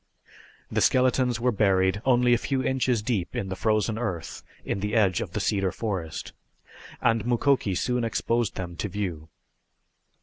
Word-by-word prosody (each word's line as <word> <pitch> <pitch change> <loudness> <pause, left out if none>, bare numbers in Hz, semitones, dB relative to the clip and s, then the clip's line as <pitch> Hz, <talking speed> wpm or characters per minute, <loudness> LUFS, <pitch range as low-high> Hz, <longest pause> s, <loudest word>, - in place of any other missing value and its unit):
The - - +1
skeletons 125 -2 +3
were 125 +1 +2
buried 95 -2 +2
only 125 -1 +4
a 120 - +3
few 135 0 -1
inches 125 -4 +1
deep 105 -7 -2
in 95 - -2
the 95 - -3
frozen 110 +2 0
earth 90 -10 -4 0.2
in - - -2
the 105 +3 -2
edge 95 -6 +3
of - - -6
the - - -1
cedar 95 -2 0
forest, 95 -8 -4 0.7
and 115 -2 +2
Mukoki 120 -3 +1
soon 125 +4 0
exposed 115 0 0
them 85 -2 -5
to 105 - -3
view. 90 -6 -4
110 Hz, 160 wpm, -26 LUFS, 95-120 Hz, 0.7 s, only